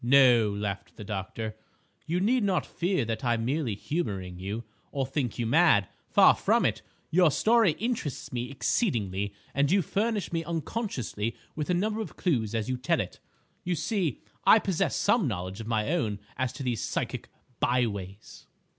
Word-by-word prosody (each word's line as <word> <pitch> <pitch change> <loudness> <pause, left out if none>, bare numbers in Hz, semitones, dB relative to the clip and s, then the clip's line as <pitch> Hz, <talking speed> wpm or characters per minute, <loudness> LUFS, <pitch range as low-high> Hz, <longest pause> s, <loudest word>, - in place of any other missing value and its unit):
"No," 125 -4 +6
laughed 100 -1 -4
the 105 - -8
doctor, 105 +2 -4 0.5
"you 170 +3 +1
need 235 +5 +2
not 190 -3 +1
fear 175 -7 0
that 115 +4 -3
I'm 120 -2 +1
merely 130 -4 0
humouring 95 - -3
you, 100 +5 -4 0.3
or 135 -2 -1
think 130 -5 -2
you 120 - -1
mad. 120 - +4 0.2
Far - - +7
from - - +2
it. - - 0 0.3
Your 175 0 +5
story 220 - +4
interests 220 - -3
me 120 0 -2
exceedingly 105 - 0 0.2
and 140 +1 +2
you 190 +2 +3
furnish 205 0 -1
me 165 0 0
unconsciously 155 - -3 0.2
with 150 +1 -3
a 180 - +3
number 215 +4 0
of 220 - -7
clues 115 - 0
as 110 0 -1
you 130 0 -1
tell 125 - +1
it. - - -4 0.4
You 175 0 0
see, 165 - -1 0.2
I - - +8
possess 190 -6 0
some 210 - +3
knowledge 95 -1 -4
of 110 - -7
my 110 +3 0
own 110 -12 0 0.2
as 130 -2 -1
to 140 - -6
these 120 -5 -1
psychic - - -3 0.3
byways." 105 -5 -2
130 Hz, 170 wpm, -28 LUFS, 110-175 Hz, 0.5 s, I